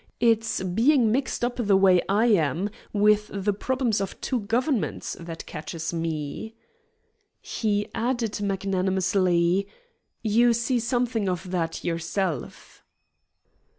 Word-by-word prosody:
It's 225 -4 +2
being 230 +6 +3
mixed 260 0 0
up 245 - -3
the 205 -5 +3
way 185 -2 +5
I 210 +4 +3
am 190 - +2 0.2
with 210 0 +3
the 200 +1 -1
problems 240 -1 0
of 195 - -5
two 255 - -1
governments 235 +4 -1
that 165 -1 -7
catches 165 +2 -5
me." 165 +6 -4 0.8
He 205 -2 -1
added 235 -3 -1
magnanimously, 190 -1 +1 0.6
"You 235 +2 +4
see 235 +2 0
something 235 -3 0
of 180 0 -4
that 165 -3 -2
yourself." 170 -2 -3
205 Hz, 115 wpm, -25 LUFS, 180-230 Hz, 0.8 s, way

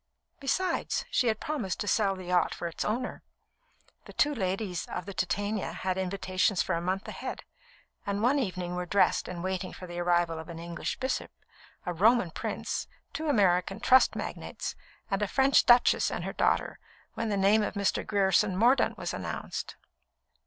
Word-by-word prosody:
Besides, 340 +6 0
she 250 - +2
had 220 -1 +1
promised 255 - -3
to 205 - -3
sell 200 -2 +2
the 185 - -8
yacht 180 0 +2
for 170 - -4
its 170 - -4
owner. 245 +4 -2 0.8
The - - -11
two 295 0 +2
ladies 190 - -2
of 180 - -5
the 200 - -7
Titania 205 +3 -1
had 185 0 -2
invitations 185 0 0
for - - -1
a 170 - -1
month 185 +2 -2
ahead, - - -6 0.6
and 200 +1 -2
one 270 +4 +4
evening 180 -7 -3
were 180 0 -3
dressed 200 +2 +2
and 175 -1 -5
waiting 185 -1 -3
for 185 - -9
the 175 -1 -6
arrival 175 -2 +1
of 160 - -9
an 170 - -7
English 170 0 -4
bishop, 260 0 -2 0.6
a 180 - -2
Roman 210 +1 +4
prince, - - -3 0.3
two 315 - -3
American 195 -4 +2
trust 255 +2 +5
magnates, - - -5 0.4
and 195 +1 0
a 210 - +1
French 270 +6 +4
duchess 240 0 +5
and - - -4
her - - -4
daughter, - - +1 0.3
when 225 - -2
the 205 - 0
name 200 +3 +4
of 210 - -2
Mr. 200 -1 0
Grierson 195 -1 +2
Mordaunt 245 +6 +3
was - - -4
announced. - - -5
195 Hz, 175 wpm, -29 LUFS, 180-225 Hz, 0.8 s, trust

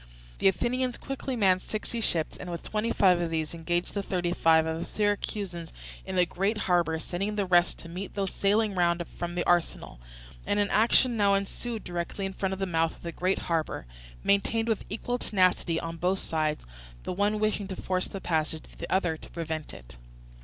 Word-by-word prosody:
The - - +4
Athenians 245 +6 +1
quickly 270 -1 -4
manned 190 -5 +4
sixty 225 +2 -4
ships, 165 -7 +1
and 180 - -7
with 170 -1 -5
twenty 215 +2 -1
five 180 -3 +4
of 170 - -1
these 160 -1 -2
engaged 175 +1 -1
the 200 - -1
thirty 175 -3 -1
five 160 -1 +4
of 160 0 -2
the - - -2
Syracusans 200 -4 -2 0.4
in 190 - -3
the 180 -1 +5
great 195 +5 0
harbour, 175 -4 +2
sending 195 +6 -3
the 205 -2 +1
rest 175 -1 +4
to - - -11
meet 180 +4 -6
those 195 -2 -1
sailing 210 +1 +2
round 175 -1 +2 0.2
from 175 0 -3
the 175 - 0
arsenal; 175 - 0 0.5
and 205 - +2
an 205 -1 +1
action 235 +3 +4
now 200 -1 +4
ensued 215 +3 -3
directly 175 +3 -3
in 195 - -3
front 190 0 -1
of - - -4
the 195 - -1
mouth 165 -2 +1
of - - -19
the 170 - -4
great 185 +3 0
harbour, 160 - -1 0.4
maintained 225 +3 +2
with 225 -3 0
equal 245 +4 -2
tenacity 185 -5 +2
on 165 0 -5
both 180 +3 +1
sides; 155 - -1 0.4
the - - -3
one 205 +3 +1
wishing 215 -2 0
to 190 - -5
force 185 0 -1
the 195 - -6
passage, 160 -3 -1 0.2
the - - -6
other 175 -4 +2
to - - -13
prevent 160 -2 -4
them. - - -11
185 Hz, 200 wpm, -28 LUFS, 170-205 Hz, 0.5 s, the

